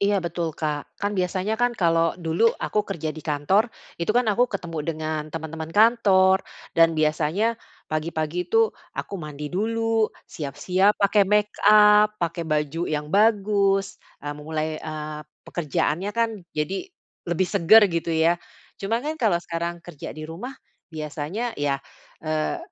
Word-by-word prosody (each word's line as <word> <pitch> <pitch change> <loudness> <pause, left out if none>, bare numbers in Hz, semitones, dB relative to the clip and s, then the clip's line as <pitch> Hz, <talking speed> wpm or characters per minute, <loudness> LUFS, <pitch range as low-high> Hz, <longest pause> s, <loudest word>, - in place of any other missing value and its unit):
Iya, 200 0 +2
betul, 170 0 -2
Kak. 150 -2 -4
Kan 205 0 -1
biasanya 185 +3 0
kan 245 0 +3
kalau 165 -3 +2
dulu 170 +6 +2
aku 215 - -2
kerja 160 -5 -3
di - - -6
kantor, 155 +10 +1 0.3
itu 170 - -2
kan 245 - +4
aku 240 +5 +3
ketemu 170 -5 -4
dengan 155 -1 -2
teman-teman 160 0 -5
kantor, 195 -4 +5 0.4
dan 165 0 +7
biasanya, 155 +5 +1 0.5
pagi-pagi 155 +2 -2
itu 450 - +3 0.4
aku - - -5
mandi 150 0 -7
dulu, 225 +2 +1 0.2
siap-siap 180 +8 +1
pakai 200 +1 +4
make 210 0 +2 0.2
up, 210 0 +6
pakai 170 0 -1
baju 150 +1 -1
yang 150 -1 -2
bagus, 200 -2 +2 0.2
eee, 145 - -3
memulai, 155 +1 -3
eee, 155 -1 -6 0.2
pekerjaannya 170 +3 -1
kan, 230 0 +3 0.3
jadi 165 +6 -1 0.5
lebih 175 +2 +1
seger, 200 +4 +7
gitu 170 0 -2 0.2
ya. 170 +1 +3 0.4
Cuma 225 +6 -1
kan 305 +1 -2
kalau 210 -7 +3
sekarang 170 0 -4
kerja 155 -3 -8
di 155 - -6
rumah 195 +12 -7 0.3
biasanya 160 +8 -4
ya, 140 -1 +1 0.5
eee, 155 - -1
170 Hz, 145 wpm, -24 LUFS, 155-205 Hz, 0.5 s, dan